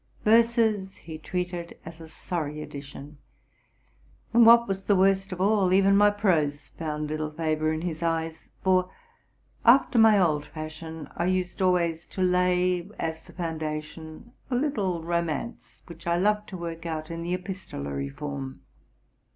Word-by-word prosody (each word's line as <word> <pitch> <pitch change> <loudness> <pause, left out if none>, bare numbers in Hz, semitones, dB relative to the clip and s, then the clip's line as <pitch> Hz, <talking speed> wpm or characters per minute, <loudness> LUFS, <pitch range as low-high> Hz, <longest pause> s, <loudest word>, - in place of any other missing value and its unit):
Verses 220 -3 +3
he 160 -2 -9
treated 180 0 -4
as 165 0 -10
a 160 - -10
sorry 155 -2 -4
addition: 140 +1 -10 1.1
and, 235 0 +7
what 235 0 +7
was 195 -1 -4
the 205 - +4
worst 195 +1 +2
of 180 - -5
all, 195 -1 +3
even 195 +1 +5
my 205 +1 +6
prose 165 -9 0
found 150 -2 -4
little 155 0 -3
favor 155 0 -1
in 160 0 -2
his 165 -2 -4
eyes; 165 -1 -2
for, 185 -1 +3 0.7
after 240 0 +5
my 220 -2 +7
old 155 -5 +2
fashion, 160 0 -8
I 170 - 0
used 185 0 -1
always 170 -3 +1
to 190 - -6
lay, 180 0 +2
as 160 0 -4
the - - -15
founda 160 -3 -3
tion, 160 +8 -12 0.2
a 250 - 0
little 205 - -1
romance, 170 +6 -3
which 170 0 -12
I 170 0 +2
loved 210 +3 +1
to 185 - -6
work 170 -1 -6
out 155 0 -4
in 165 0 -5
the 175 +2 -1
epis 190 +1 -8
tolary 70 0 -4
form. 135 - -6
170 Hz, 160 wpm, -26 LUFS, 155-195 Hz, 1.1 s, and